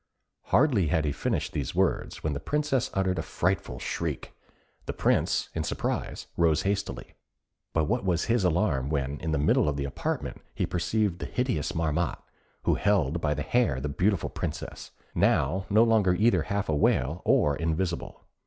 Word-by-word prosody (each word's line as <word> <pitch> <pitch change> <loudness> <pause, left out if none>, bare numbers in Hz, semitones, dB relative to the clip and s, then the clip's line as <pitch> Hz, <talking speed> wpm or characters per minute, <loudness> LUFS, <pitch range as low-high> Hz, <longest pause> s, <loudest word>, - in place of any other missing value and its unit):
Hardly 125 - +3
had 75 +1 +1
he 75 - +1
finished - - -2
these 70 -4 -3
words, - - 0
when 75 - 0
the 70 - -3
Princess 135 - 0
uttered 95 -2 +1
a - - +1
frightful 90 -7 -1
shriek. - - -4 0.5
The - - -2
Prince, - - +1
in - - -2
surprise, - - -3
rose 80 -2 +3
hastily. 100 0 -2 0.6
But 80 - +1
what 120 +10 0
was 90 -3 +1
his 115 -3 +2
alarm 85 -7 +1
when, 70 -1 -1
in 80 - -3
the 80 - +1
middle 75 +1 +3
of 70 - -2
the 70 - -1
apartment, 70 - -3
he - - 0
perceived 95 0 0
the - - -4
hideous 125 - -1
Marmotte, 80 +1 -1 0.4
who - - +3
held 85 -6 +1
by 75 -1 +1
the 75 - -3
hair 110 - +1
the 75 +2 -3
beautiful 90 +5 0
Princess, - - -5 0.2
now 90 +8 +2
no 110 +3 +5
longer 110 -6 +3
either 115 +5 +3
half 100 0 -2
a 75 - +1
whale 75 +2 +1
or 75 -1 +3
invisible! 85 +2 -2
85 Hz, 170 wpm, -28 LUFS, 75-100 Hz, 0.6 s, no